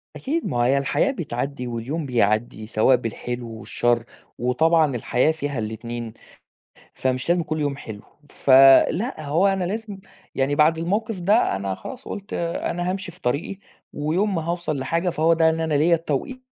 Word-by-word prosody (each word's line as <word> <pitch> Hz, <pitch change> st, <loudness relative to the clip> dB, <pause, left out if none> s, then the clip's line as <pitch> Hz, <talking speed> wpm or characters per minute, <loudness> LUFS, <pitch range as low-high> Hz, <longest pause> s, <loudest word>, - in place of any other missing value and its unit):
أكيد 320 Hz, +5 st, -2 dB
ما 120 Hz, -, -2 dB
هي 135 Hz, +3 st, +3 dB
الحياة 140 Hz, -, +1 dB
بتعدّي، 140 Hz, -, -4 dB
واليوم 125 Hz, +7 st, -4 dB
بيعدّي 110 Hz, -2 st, 0 dB
سواء 110 Hz, +4 st, +4 dB
بالحلو 120 Hz, +1 st, -5 dB
والشر، 120 Hz, 0 st, 0 dB, 0.3 s
وطبعًا 150 Hz, +4 st, +2 dB
الحياة 125 Hz, +5 st, +1 dB
فيها 145 Hz, -4 st, -4 dB
الإتنين، 115 Hz, +1 st, -5 dB, 0.8 s
فمش 130 Hz, +2 st, -2 dB
لازم 175 Hz, 0 st, +3 dB
كُلّ 155 Hz, 0 st, -3 dB
يوم 145 Hz, -2 st, -1 dB
حلو، 110 Hz, -6 st, -9 dB, 0.3 s
ف -, -, -7 dB, 0.4 s
لأ 180 Hz, -, -3 dB
هو 165 Hz, +7 st, +2 dB
أنا 195 Hz, -1 st, 0 dB
لازم، 205 Hz, +2 st, -4 dB, 0.4 s
يعني 135 Hz, +2 st, +1 dB
بعد 155 Hz, +2 st, +4 dB
الموقف 205 Hz, +5 st, -2 dB
ده 205 Hz, -, +2 dB
أنا 95 Hz, 0 st, -3 dB
خلاص 255 Hz, -, -9 dB
قُلت 205 Hz, 0 st, -7 dB
أنا 175 Hz, +1 st, -2 dB
هامشي 190 Hz, -1 st, -4 dB
في -, -, -17 dB
طريقي، 145 Hz, +10 st, -2 dB, 0.3 s
ويوم 180 Hz, +8 st, 0 dB
ما 165 Hz, -, -1 dB
هاوصل 170 Hz, -3 st, -2 dB
لحاجة 165 Hz, +7 st, 0 dB
فهو 165 Hz, 0 st, +2 dB
ده 165 Hz, 0 st, +4 dB
إن 160 Hz, 0 st, -1 dB
أنا 160 Hz, -1 st, -1 dB
ليّا 160 Hz, +4 st, +4 dB
التوقيت 165 Hz, -, -3 dB
155 Hz, 165 wpm, -23 LUFS, 125-175 Hz, 0.8 s, سواء